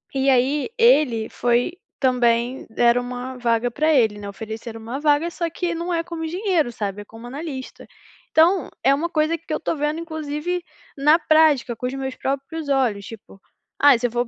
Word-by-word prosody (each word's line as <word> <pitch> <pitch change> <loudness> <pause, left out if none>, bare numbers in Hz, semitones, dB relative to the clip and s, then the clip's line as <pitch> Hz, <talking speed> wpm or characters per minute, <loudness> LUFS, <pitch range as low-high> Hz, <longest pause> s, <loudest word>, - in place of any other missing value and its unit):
E 270 0 +2
aí 265 +3 +2
ele 295 - +4
foi 245 +6 +1 0.3
também 245 -1 +1
deram 240 +2 +3
uma 250 +1 -6
vaga 235 0 +1
para 310 +5 +2
ele, 220 -7 +3
né, 205 - -7
ofereceram 225 +2 -7
uma 235 +5 -5
vaga, 295 +2 +2
só 340 0 -2
que 345 +1 -3
não 340 +2 -3
é 335 -1 0
como 335 -1 -6
engenheiro, 350 - 0
sabe, 205 -3 -4
é - - -25
como 225 +3 -12
analista. 270 0 -7 0.5
Então 335 +1 +4
é 270 - +5
uma 330 +4 -2
coisa 310 +1 +1
que 325 -1 -7
eu - - -1
tô 325 - -2
vendo 300 +2 -1
inclusive 315 +2 -4 0.3
na 300 +4 +5
prática, 310 -6 +3
com 250 - -6
os 255 - -4
meus 265 -1 -4
próprios 280 +3 -4
olhos, 245 -8 +1
tipo, 205 -2 -12 0.4
"Ah, 285 -2 +7
se 245 +1 0
eu - - -10
vou 240 +1 0
para - - -16
270 Hz, 195 wpm, -22 LUFS, 240-315 Hz, 0.5 s, Ah